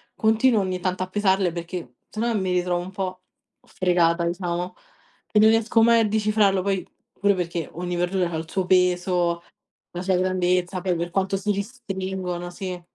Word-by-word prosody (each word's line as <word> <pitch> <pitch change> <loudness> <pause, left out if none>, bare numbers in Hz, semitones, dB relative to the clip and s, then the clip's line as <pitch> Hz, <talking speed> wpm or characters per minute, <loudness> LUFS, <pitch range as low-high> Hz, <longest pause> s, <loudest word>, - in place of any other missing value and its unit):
continuo 220 +1 +3
ogni 185 -1 -2
tanto 185 0 -1
a 185 - -7
pesarle, 190 -2 +2
perché 170 -6 -6
se 215 - -5
no 235 0 +1
mi 185 -1 -1
ritrovo 180 -1 0
un 180 +2 -8
po' 185 -1 -4 0.5
fregata, 170 -2 +2
diciamo, 175 +1 -3 0.6
e 210 - +4
non 215 +1 +7
riesco 225 +1 +3
mai 230 0 +6
a 220 - +2
decifrarlo. 210 -2 +2
Poi, 195 -1 -1 0.3
pure 200 0 +2
perché, 170 -3 -3
ogni 175 +1 -3
verdura 180 0 0
ha - - -3
il 160 0 -6
suo 190 +1 -1
peso, 180 -1 +2 0.5
la 175 - -5
sua 190 0 +1
grandezza, 185 0 +1
poi 180 -1 0
per 170 +1 -3
quanto 195 +1 0
si 200 +2 -1
restringono 190 -5 -4
sì. 180 -1 -6
185 Hz, 175 wpm, -24 LUFS, 175-200 Hz, 0.6 s, non